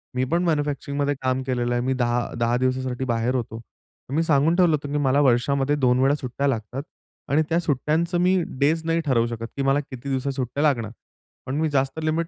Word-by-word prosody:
मी 125 Hz, -, +1 dB
पण 170 Hz, +1 st, +2 dB
मॅन्युफॅक्चरिंगमध्ये 145 Hz, -3 st, -1 dB
काम 130 Hz, 0 st, 0 dB
केलेलं 120 Hz, -1 st, -1 dB
आहे. 120 Hz, -, 0 dB
मी 130 Hz, -, +1 dB
10 120 Hz, -1 st, +1 dB, 0.2 s
10 120 Hz, +1 st, +2 dB
दिवसासाठी 130 Hz, 0 st, -1 dB
बाहेर 120 Hz, +1 st, 0 dB
होतो. 115 Hz, -2 st, -4 dB, 0.5 s
मी 160 Hz, +3 st, +1 dB
सांगून 155 Hz, +1 st, +3 dB
ठेवलं 175 Hz, -3 st, +4 dB
होतं 145 Hz, -1 st, -6 dB
की 145 Hz, -, 0 dB
मला 140 Hz, -1 st, +2 dB
वर्षामध्ये 135 Hz, +2 st, +2 dB
2 125 Hz, -3 st, +2 dB
वेळा 135 Hz, +2 st, +3 dB
सुट्ट्या 140 Hz, 0 st, -3 dB
लागतात 125 Hz, +2 st, -3 dB, 0.5 s
आणि 150 Hz, +3 st, +4 dB
त्या 165 Hz, +1 st, +2 dB
सुट्ट्यांचं 165 Hz, +3 st, 0 dB
मी 185 Hz, 0 st, +3 dB, 0.2 s
डेज 160 Hz, +3 st, +2 dB
नाही 165 Hz, 0 st, +1 dB
ठरवू 120 Hz, -5 st, +2 dB
शकत 115 Hz, -1 st, -5 dB
की -, -, 0 dB
मला 135 Hz, +1 st, +3 dB
किती 135 Hz, -1 st, -8 dB
दिवसा 135 Hz, +1 st, -1 dB
सुट्ट्या 135 Hz, +2 st, -2 dB
लागणार. 120 Hz, -8 st, +1 dB, 0.5 s
पण 130 Hz, -, -3 dB
मी 160 Hz, -, +1 dB
जास्त 135 Hz, +1 st, 0 dB
लिमिट 160 Hz, +1 st, 0 dB
135 Hz, 200 wpm, -24 LUFS, 125-150 Hz, 0.5 s, ठेवलं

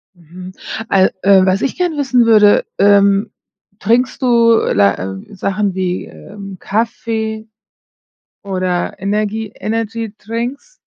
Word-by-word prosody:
Mhm. 180 Hz, +2 st, -12 dB, 0.4 s
Äh, 190 Hz, -1 st, +4 dB
äh, 190 Hz, -1 st, +5 dB
was 190 Hz, +2 st, +1 dB
ich 275 Hz, -, -2 dB
gerne 355 Hz, -4 st, -1 dB
wissen 260 Hz, -4 st, +2 dB
würde, 210 Hz, -2 st, +5 dB
ähm, 200 Hz, 0 st, +3 dB, 0.5 s
trinkst 250 Hz, +6 st, 0 dB
du, 235 Hz, -2 st, +4 dB, 0.2 s
la 100 Hz, 0 st, +4 dB
äh, 95 Hz, -, -8 dB
Sachen 195 Hz, 0 st, -2 dB
wie, 185 Hz, -1 st, -2 dB
ähm, 200 Hz, -2 st, -11 dB
Kaffee 220 Hz, 0 st, -3 dB, 1.0 s
oder 185 Hz, -2 st, -2 dB
Energie 210 Hz, +2 st, -2 dB
Energydrinks? 230 Hz, -, -5 dB
210 Hz, 110 wpm, -16 LUFS, 190-230 Hz, 1.0 s, äh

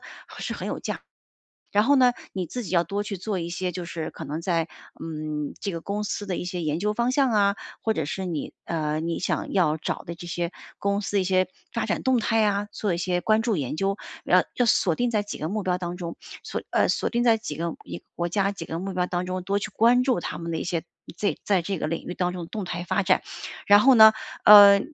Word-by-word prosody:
价。 -, -, -15 dB, 1.7 s
然 205 Hz, -, +6 dB
后 280 Hz, +4 st, +4 dB
呢， 250 Hz, -1 st, +5 dB, 0.2 s
你 185 Hz, -2 st, -3 dB
自 245 Hz, +8 st, -5 dB
己 195 Hz, -, -7 dB
要 170 Hz, -2 st, +2 dB
多 200 Hz, +4 st, -2 dB
去 205 Hz, -1 st, -5 dB
做 195 Hz, +2 st, -3 dB
一 170 Hz, 0 st, -3 dB
些， 180 Hz, +1 st, -3 dB
就 180 Hz, -, -4 dB
是 170 Hz, -1 st, -5 dB
可 -, -, -9 dB
能 150 Hz, +3 st, -4 dB
在， 170 Hz, -1 st, 0 dB, 0.3 s
嗯， 155 Hz, -2 st, -4 dB
这 200 Hz, -, -3 dB
个 165 Hz, -, -4 dB
公 205 Hz, +4 st, -3 dB
司 205 Hz, -, -3 dB
的 185 Hz, -3 st, -2 dB
一 -, -, -4 dB
些 180 Hz, -1 st, -3 dB
研 155 Hz, 0 st, -1 dB
究 210 Hz, +3 st, 0 dB
方 240 Hz, +3 st, +1 dB
向 265 Hz, -2 st, +3 dB
啊， 200 Hz, -1 st, +3 dB, 0.3 s
或 220 Hz, -, +1 dB
者 160 Hz, -7 st, -2 dB
是 190 Hz, +6 st, -4 dB
你， 165 Hz, -5 st, -4 dB
呃 155 Hz, -2 st, -2 dB
你 165 Hz, 0 st, -2 dB
想 -, -, -2 dB
要 170 Hz, -6 st, +3 dB
找 160 Hz, -, -4 dB
的 170 Hz, -, -6 dB
这 175 Hz, -, -10 dB
些 175 Hz, 0 st, -3 dB, 0.3 s
公 200 Hz, 0 st, 0 dB
司 205 Hz, 0 st, 0 dB
一 185 Hz, -, 0 dB
些 185 Hz, -1 st, +2 dB, 0.2 s
发 -, -, -1 dB
展 -, -, -1 dB
动 260 Hz, -1 st, +3 dB
态 225 Hz, 0 st, +2 dB
啊， 205 Hz, 0 st, 0 dB
做 205 Hz, -2 st, -1 dB
一 170 Hz, -, -1 dB
些 180 Hz, 0 st, 0 dB
关 215 Hz, +4 st, +2 dB
注 225 Hz, -4 st, 0 dB
研 140 Hz, -1 st, -2 dB
究。 195 Hz, +4 st, 0 dB, 0.3 s
要 -, -, +4 dB
要 245 Hz, -, +2 dB
锁 185 Hz, -6 st, +3 dB
定 245 Hz, +4 st, 0 dB
在 215 Hz, -, +2 dB
几 205 Hz, 0 st, -6 dB
个 155 Hz, -, -3 dB
目 215 Hz, 0 st, -2 dB
标 180 Hz, -1 st, +1 dB
当 175 Hz, -1 st, -5 dB
中， 170 Hz, -2 st, -5 dB, 0.3 s
锁 -, -, -4 dB
呃， -, -, +3 dB
锁 -, -, 0 dB
定 240 Hz, +1 st, 0 dB
在 230 Hz, -2 st, +6 dB
几 155 Hz, -10 st, -6 dB
个 170 Hz, 0 st, -2 dB
一 85 Hz, 0 st, -8 dB
国 175 Hz, 0 st, -1 dB
家 200 Hz, +2 st, +1 dB
几 185 Hz, -, -7 dB
个 165 Hz, 0 st, -5 dB
目 190 Hz, +1 st, -4 dB
标 180 Hz, -1 st, +1 dB
当 180 Hz, 0 st, -2 dB
中， 185 Hz, 0 st, -3 dB
多 200 Hz, +2 st, 0 dB
去 -, -, -4 dB
关 240 Hz, +3 st, +5 dB
注 250 Hz, -8 st, +1 dB
他 -, -, -4 dB
们 170 Hz, 0 st, -5 dB
的 -, -, -1 dB
一 -, -, -3 dB
些 170 Hz, -1 st, -2 dB, 0.3 s
这 205 Hz, -, 0 dB
在 195 Hz, -4 st, +2 dB
这 195 Hz, +3 st, -3 dB
个 155 Hz, -, -2 dB
领 165 Hz, +1 st, -3 dB
域 180 Hz, -, -4 dB
当 180 Hz, 0 st, -1 dB
中 180 Hz, -1 st, -5 dB
的 165 Hz, -, -8 dB
动 215 Hz, +1 st, -5 dB
态 175 Hz, -1 st, -4 dB
发 200 Hz, -, +1 dB
展。 -, -, +3 dB, 0.5 s
然 205 Hz, 0 st, +8 dB
后 265 Hz, +1 st, +6 dB
呢， 220 Hz, -1 st, +9 dB, 0.3 s
呃， 205 Hz, -1 st, +10 dB
185 Hz, 270 characters per minute, -25 LUFS, 170-210 Hz, 1.7 s, 呃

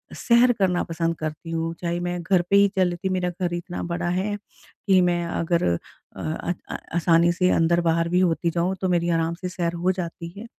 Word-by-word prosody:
सैर 240 Hz, +1 st, +4 dB
करना 180 Hz, -2 st, +2 dB
पसंद 165 Hz, 0 st, -2 dB
करती 155 Hz, +1 st, -5 dB
हूँ, 165 Hz, 0 st, -2 dB
चाहे 170 Hz, 0 st, -1 dB
मैं 175 Hz, 0 st, -3 dB
घर 185 Hz, 0 st, +3 dB
पे 200 Hz, -, +4 dB
ही 200 Hz, 0 st, +6 dB
चल 185 Hz, -1 st, +4 dB
लेती 175 Hz, +2 st, -3 dB
मेरा 185 Hz, -1 st, 0 dB
घर 175 Hz, -1 st, 0 dB
इतना 175 Hz, +1 st, -5 dB
बड़ा 175 Hz, 0 st, -2 dB
है, 190 Hz, +4 st, -1 dB, 0.5 s
कि 190 Hz, -1 st, +5 dB
मैं 175 Hz, -1 st, +1 dB
अगर 170 Hz, 0 st, 0 dB, 0.5 s
अ 160 Hz, +2 st, -3 dB, 0.2 s
अ, -, -, -3 dB, 0.2 s
आसानी 170 Hz, 0 st, +4 dB
से 180 Hz, +1 st, +2 dB
अंदर-बाहर 165 Hz, 0 st, +2 dB
भी 180 Hz, +1 st, +2 dB
होती 170 Hz, -1 st, +1 dB
जाऊँ 175 Hz, +3 st, 0 dB
तो 185 Hz, -, 0 dB
मेरी 175 Hz, -1 st, +1 dB
आराम 165 Hz, 0 st, +1 dB
से 180 Hz, -, -3 dB
सैर 175 Hz, -2 st, -2 dB
हो 175 Hz, +2 st, +1 dB
जाती 175 Hz, -2 st, -5 dB
है। 215 Hz, -, -7 dB
175 Hz, 205 wpm, -24 LUFS, 170-185 Hz, 0.5 s, ही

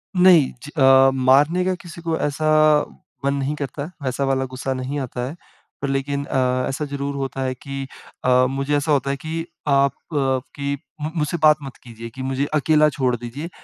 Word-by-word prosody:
नहीं। 180 Hz, -6 st, +6 dB
ज 145 Hz, -, -9 dB
अ, 135 Hz, -1 st, +7 dB
मारने 140 Hz, +7 st, +4 dB
का 185 Hz, -, +1 dB
किसी 170 Hz, -2 st, -10 dB
को 165 Hz, -1 st, -1 dB
ऐसा 150 Hz, +2 st, -1 dB, 0.8 s
मन 140 Hz, -, +2 dB
नहीं 140 Hz, +1 st, -1 dB
करता, 140 Hz, 0 st, -5 dB, 0.2 s
वैसा 130 Hz, +1 st, -1 dB
वाला 135 Hz, -1 st, +1 dB
गुस्सा 130 Hz, +1 st, -4 dB
नहीं 130 Hz, +3 st, -3 dB
आता 125 Hz, -2 st, -4 dB
है। 145 Hz, -, -7 dB, 0.5 s
पर 140 Hz, -, -1 dB
लेकिन 140 Hz, +1 st, -1 dB
अ, 130 Hz, -1 st, 0 dB
ऐसा 135 Hz, +3 st, -3 dB
ज़रूर 140 Hz, 0 st, -4 dB
होता 135 Hz, -1 st, -3 dB
है 130 Hz, 0 st, -1 dB
कि 135 Hz, +1 st, -6 dB, 0.4 s
अ, 125 Hz, 0 st, +5 dB
मुझे 140 Hz, +2 st, -1 dB
ऐसा 145 Hz, +2 st, -1 dB
होता 140 Hz, -2 st, +2 dB
है 140 Hz, -, 0 dB
कि 165 Hz, +1 st, -3 dB, 0.2 s
आप 140 Hz, -1 st, +4 dB, 0.2 s
की 140 Hz, +1 st, -1 dB, 0.3 s
मु 150 Hz, -, -2 dB
मुझसे 155 Hz, +1 st, -1 dB
बात 150 Hz, 0 st, +7 dB
मत 135 Hz, -2 st, -8 dB
कीजिए 115 Hz, -1 st, -9 dB
की 135 Hz, -, -6 dB
मुझे 135 Hz, +1 st, -1 dB
अकेला 155 Hz, 0 st, +4 dB
छोड़ 130 Hz, -4 st, 0 dB
दीजिए, 120 Hz, +7 st, -6 dB
140 Hz, 190 wpm, -22 LUFS, 130-150 Hz, 0.8 s, अ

